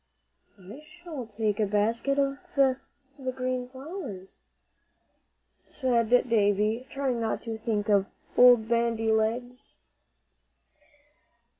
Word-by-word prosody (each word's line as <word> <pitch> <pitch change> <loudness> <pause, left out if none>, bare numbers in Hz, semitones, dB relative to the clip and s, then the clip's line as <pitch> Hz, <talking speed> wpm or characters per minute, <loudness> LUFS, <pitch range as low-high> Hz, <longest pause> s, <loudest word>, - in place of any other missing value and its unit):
"I 200 +9 -12
shall 310 -5 -9
take 215 -1 -2
a 215 - +2
basket 225 +7 +1 0.4
for 265 -2 +3 0.4
the 260 -1 -3
green 255 -1 -3
flowers," 260 - -9 1.3
said 240 -5 0 0.2
Davie, 215 +2 +1
trying 265 -4 -2
not 225 -1 -2
to 225 -2 -4
think 220 -1 -2
of 200 -2 +3 0.3
"Old 245 -3 +7
Bandy 230 -1 +1
Legs." 240 +3 -2
235 Hz, 100 wpm, -27 LUFS, 220-255 Hz, 1.3 s, Old